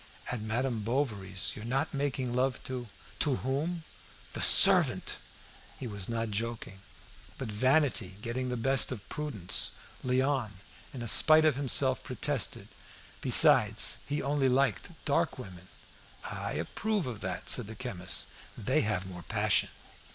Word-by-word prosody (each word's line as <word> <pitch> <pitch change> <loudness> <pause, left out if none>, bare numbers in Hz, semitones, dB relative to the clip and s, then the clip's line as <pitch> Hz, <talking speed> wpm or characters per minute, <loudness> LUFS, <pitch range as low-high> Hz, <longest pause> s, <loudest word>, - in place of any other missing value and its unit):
"At 125 -3 -4
Madame 115 +2 -3
Bovary's, 105 -6 -1
you're 105 - -10
not 130 +4 -3
making 135 -3 -3
love 130 +1 -2
to 125 -2 -7 0.2
" - - -23
"To 140 -3 0
whom?" 150 +7 -4 0.5
"The - - -6
servant!" - - +7 0.6
He - - -7
was 100 -4 -3
not 115 -1 -4
joking; 110 -2 -6 0.6
but 125 -5 -7
vanity 130 -4 0
getting 125 +2 -4
the 125 - -4
better 135 +2 +1
of 105 - -13
all - - -25
prudence, 135 - +1 0.3
Léon, 130 -3 -1 0.4
in 120 -3 -8
spite 155 +7 +5
of 155 -4 +2
himself 130 -1 +3
protested. 130 0 -3 0.5
Besides, - - +4
he 145 +1 -4
only 140 -1 -1
liked 135 +2 -1 0.2
dark 140 - -1
women. 95 -7 -12 0.6
"I - - -6
approve 215 -3 -3
of 120 -5 -8
that," 90 -1 -6
said 120 -5 +1
the 110 - -10
chemist; 100 -8 -2 0.3
"they - - -1
have 105 -3 -3
more 90 -2 -10
passion." - - 0
125 Hz, 145 wpm, -28 LUFS, 105-135 Hz, 0.6 s, servant